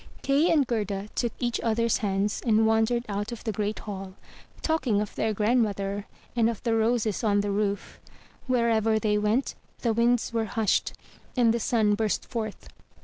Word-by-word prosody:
Kay 280 +5 +3
and 295 -4 +4
Gerda 210 -4 -2
took 240 -2 -1
each 240 -1 -1
other's 230 0 +1
hands, 200 0 -1
and 220 -2 +3
wandered 225 +2 +2
out 205 +1 -3
of 235 - -7
the 220 - -1
great 210 0 -2
hall, 195 -2 -7 0.5
talking 275 -10 +1
of 210 -1 -3
their 220 - 0
grandmother, 205 -2 0 0.3
and 230 -1 +3
of 230 - -5
the 230 -2 +1
roses 225 -2 +1
on 205 -2 +3
the 205 0 -2
roof. 200 0 -2 0.5
Wherever 225 -3 +2
they 210 -1 +1
went, 215 +6 +1 0.3
the 230 -2 +2
winds 235 +1 +2
were 225 -1 +1
hushed, 220 -1 0 0.4
and 235 -2 +4
the 235 - 0
sun 215 -2 +2
burst 215 0 0
forth. 220 -4 -5
220 Hz, 170 wpm, -27 LUFS, 210-235 Hz, 0.5 s, and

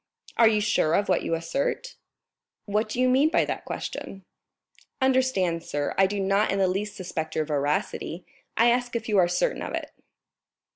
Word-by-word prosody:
"Are 230 - +6
you 215 -1 +3
sure 165 -6 +2
of 205 - 0
what - - +3
you 165 - -1
assert?" 275 - -3 0.7
"What 210 +1 0
do 245 - -4
you 255 - +4
mean 265 +4 +4
by 335 - +2
that - - -4
question?" 195 -1 -6 0.7
"Understand, 255 - +1
sir, 145 -3 -2
I 195 - +4
do 200 +1 -3
not 195 +2 +2
in 195 - 0
the 190 -1 +3
least 205 +3 -2
suspect 175 -5 -5
your 155 - 0
veracity; 150 +3 -2 0.3
I 235 +1 +5
ask 245 0 -1
if 225 -1 -3
you 210 -3 +3
are 175 - +5
certain - - 0
of - - -4
it?" - - -5
200 Hz, 185 wpm, -26 LUFS, 175-240 Hz, 0.7 s, Are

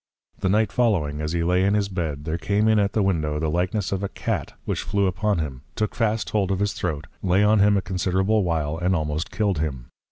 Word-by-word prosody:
The 95 - 0
Night 110 +3 +2
following, 85 -12 +1
as 75 +1 -2
he 85 -1 0
lay 90 +2 +2
in 100 +2 +3
his 105 -1 +1
Bed, 80 -7 -4
there 80 +1 -2
came 105 +4 +1
in 110 -1 +4
at 100 -1 +1
the 110 - +2
Window, 80 -6 0
the 75 0 -1
likeness 90 +3 -1
of 95 -1 -1
a 100 - -2
Cat, - - -3
which - - -1
flew 100 -1 0
upon 105 +2 0
him, 70 -6 -4
took 110 - -1
fast 110 -6 0
hold 100 -3 +1
of 95 - +1
his 100 +1 0
Throat, 75 -5 -3 0.2
lay 95 +2 +3
on 105 +1 +4
him 100 0 +5
a 95 - -1
considerable 95 +3 +1
while, 80 -2 -1
and 90 +1 +1
almost 75 0 -2
killed 100 -7 0
him. 65 -6 -3
95 Hz, 235 wpm, -24 LUFS, 80-100 Hz, 0.2 s, him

